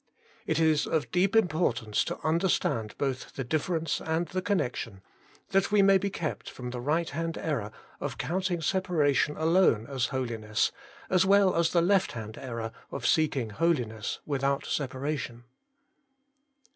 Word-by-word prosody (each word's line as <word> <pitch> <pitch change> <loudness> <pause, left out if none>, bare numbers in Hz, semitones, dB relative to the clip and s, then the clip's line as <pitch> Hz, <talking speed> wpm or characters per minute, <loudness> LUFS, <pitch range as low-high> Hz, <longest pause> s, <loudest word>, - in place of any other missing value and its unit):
It 160 0 +1
is 160 -2 +3
of 160 -3 -1
deep 185 +4 +2
importance 150 - +2
to - - -3
under 165 +4 +2
stand 110 -9 0
both 135 -2 -3
the 135 - -3
difference 160 +5 -1
and 160 +2 0
the 185 - -2
connection, 125 - -2 0.5
that 195 +1 +2
we 205 -1 +5
may 195 0 +6
be 200 +2 -1
kept 170 -5 -4
from 125 -1 -7
the 125 -1 -5
right 160 +6 +1
hand 165 +2 -3
error 120 -10 -2 0.3
of - - -4
counting 180 0 -1
separation 155 -5 +1
alone 160 - +3
as 130 -2 -1
holiness, 115 -5 -1 0.4
as 185 -1 +5
well 195 -1 +4
as 165 -1 +3
the 170 -1 +3
left 195 +1 +2
hand 110 -2 -6
error 115 -4 -5 0.2
of 130 -3 -5
seeking 135 -8 +2
holiness 120 -7 0
without 140 -1 0
separation. 130 -3 -3
155 Hz, 150 wpm, -28 LUFS, 125-175 Hz, 0.5 s, may